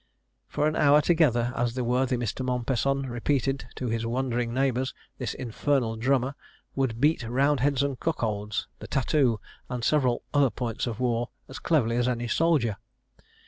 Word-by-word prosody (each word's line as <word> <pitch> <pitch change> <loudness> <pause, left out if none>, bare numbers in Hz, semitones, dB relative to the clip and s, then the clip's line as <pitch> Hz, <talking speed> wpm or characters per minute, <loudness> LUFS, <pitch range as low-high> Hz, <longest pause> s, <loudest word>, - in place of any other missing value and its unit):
For 150 - 0
an 155 - 0
hour 145 0 +5
together, 135 -8 +2
as 120 0 -1
the 130 - -1
worthy 125 +1 +1
Mr. 120 +2 -3
Mompesson 130 +2 0
repeated 135 +2 -1
to 130 - -4
his 115 0 -1
wondering 120 0 -1
neighbours, 130 0 0 0.2
this 125 - -3
infernal 125 -1 0
drummer 130 +3 +1 0.4
"would 130 -4 -1
beat 150 +3 +3
'Roundheads 135 +3 +2
and 140 -3 -2
Cuckolds,' 105 -9 -2
the - - -8
'Tat 135 - 0
too,' 130 -8 +2 0.3
and 125 -2 -4
several 130 -4 +2
other 145 -2 +4
points 120 0 -3
of 120 0 -4
war, 120 -1 0 0.2
as 130 - -8
cleverly 120 -8 +1
as 120 0 +2
any 120 -1 -1
soldier." 135 -8 +2
125 Hz, 160 wpm, -27 LUFS, 120-140 Hz, 0.4 s, hour